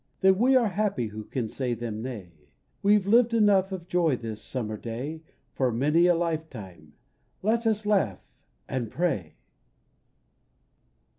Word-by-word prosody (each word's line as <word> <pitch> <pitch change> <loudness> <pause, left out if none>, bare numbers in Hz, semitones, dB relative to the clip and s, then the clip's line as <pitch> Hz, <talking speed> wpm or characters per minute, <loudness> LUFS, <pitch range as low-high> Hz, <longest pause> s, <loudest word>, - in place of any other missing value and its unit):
Then 190 0 +5
we 260 +3 +4
are 240 -4 +4
happy 190 - -1
who 110 +1 -7
can 125 -4 -3
say 125 +1 -2
them 115 -2 -5
nay: 110 -8 -7 0.5
We've 205 -1 +4
lived 230 +3 +4
enough 200 -3 +4
of 180 -2 -6
joy 170 -5 +2
this 110 -2 -6
summer 110 -4 -4
day 125 +9 -6 0.3
For 130 -1 +1
many 150 +9 +3
a 175 - +4
life 165 -2 -1
time. 90 - -11 0.5
Let 225 +3 +1
us 215 -1 0
laugh 195 - +2 0.3
— - - -44
and 125 -4 -3
pray 130 - -2
160 Hz, 150 wpm, -27 LUFS, -, 0.5 s, Then